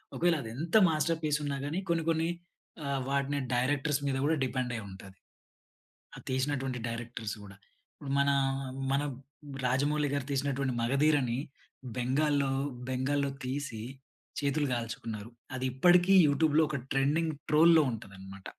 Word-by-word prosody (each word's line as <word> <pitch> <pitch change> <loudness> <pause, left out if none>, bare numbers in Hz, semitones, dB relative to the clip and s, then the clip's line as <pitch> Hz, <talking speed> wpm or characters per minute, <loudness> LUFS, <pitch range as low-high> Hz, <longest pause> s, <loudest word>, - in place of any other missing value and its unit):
ఒకవేళ, 175 -1 +3
అది 115 - -7
ఎంత 165 +6 -3
మాస్టర్‌పీస్ 155 -1 0
ఉన్నా 140 -1 -2
గాని, 160 +6 -2
కొన్ని 165 -1 +1
కొన్ని 165 0 +1 0.6
ఆహ్, 140 -1 -1
వాటిని 140 +1 0 0.2
డైరెక్టర్స్ 140 +3 +1
మీద 135 -1 0
కూడా 160 +2 +3
డిపెండ్ 125 -1 -2
అయి 110 - -6
ఉంటది. 95 0 -11 1.0
అది - - -11
తీసినటువంటి 130 -1 -1
డైరెక్టర్స్ 115 -2 -5
గూడా. 100 -1 -12 0.4
ఇప్పుడు 140 -3 -7
మనా, 140 0 +3 0.6
మన 140 +1 +2 0.6
రాజమౌళి 145 +4 +1
గారు 140 -2 -1
తీసినటువంటి 135 -1 0
మగధీరని 135 0 +2 0.6
బెంగాల్లో, 140 +2 +1 0.4
బెంగాల్లో 140 +2 0 0.2
తీసి 130 -4 -4 0.6
చేతులు 145 +1 0
కాల్చుకున్నారు. 115 -2 -4 0.3
అది 130 0 -2
ఇప్పటికి 175 +8 +5
యూట్యూబ్‌లో 150 +2 +3
ఒక 150 - -2
ట్రెండింగ్ 150 +4 +1 0.2
ట్రోల్‌లో 160 +2 +6
ఉంటదనమాట. 100 -3 -9
140 Hz, 125 wpm, -30 LUFS, 125-150 Hz, 1.0 s, ట్రోల్‌లో